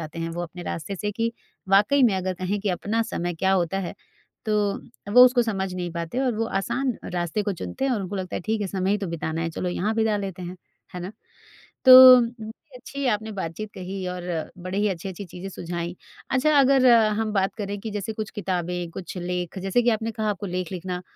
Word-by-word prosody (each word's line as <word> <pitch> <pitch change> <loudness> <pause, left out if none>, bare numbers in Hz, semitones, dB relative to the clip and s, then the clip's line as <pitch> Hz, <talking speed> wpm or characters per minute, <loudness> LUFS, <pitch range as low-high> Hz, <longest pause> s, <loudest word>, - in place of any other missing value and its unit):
जाते 155 +1 -7
हैं 165 0 -2
वो 170 +1 -4
अपने 175 +1 -7
रास्ते 175 +3 -5
से, 210 +3 -2
कि 230 +2 -1 0.4
वाकई 205 +9 +4
में 230 -6 +5
अगर 185 0 -2
कहें 185 +3 -2
कि 205 - -2
अपना 205 +5 0
समय 175 0 -2
क्या 190 +4 +1
होता 185 0 +1
है, 185 -3 -4 0.5
तो 210 0 -2
वो 250 +2 +10
उसको 250 -1 +4
समझ 195 -5 -2
नहीं 175 -1 -3
पाते। 170 +6 -4
और 255 -3 +1
वो 225 +1 -1
आसान 255 +5 -1 0.2
रास्ते 175 +4 -1
को 205 0 -1
चुनते 230 +8 -4
हैं 270 - +2
और 225 - 0
उनको 190 +2 -5
लगता 185 -2 -4
है, - - -3
ठीक 220 +3 -1
है 205 - -1
समय 190 0 -1
ही 205 - +2
तो 200 - -3
बिताना 165 -1 -3
है, 165 - -2
चलो 180 +3 -3
यहाँ 200 +5 -1
बिता 220 -1 +2
लेते 195 -3 -5
हैं, 180 +1 -6 0.4
है 180 - -5
ना? 180 +3 -6 0.7
तो 255 -1 +11 0.2
बहुत 235 +6 -11
अच्छी 280 +3 -6
आपने 215 +1 -3
बातचीत 195 +2 -5
कही 185 0 -5
और 180 0 -5 0.4
बड़े 185 +2 -4
ही 210 +1 +2
अच्छी-अच्छी 190 +1 -5
चीज़ें 180 +1 -8
सुझाईं। 175 -1 -5 0.4
अच्छा 285 +4 +3
अगर 270 -1 +5 0.3
हम 220 -1 -1
बात 195 -1 +1
करें 205 -1 -4
कि 220 - -5
जैसे 205 +1 -4
कुछ 215 -1 -5
किताबें, 180 -4 -3
कुछ 185 +2 -8
लेख 180 +1 -3
जैसे 195 +6 +1
कि 240 - +3
आपने 225 0 -1
कहा 215 -1 -2
आपको 205 0 -4
लेख 180 -1 -3
लिखना 180 0 -4
195 Hz, 220 wpm, -24 LUFS, 180-220 Hz, 0.7 s, तो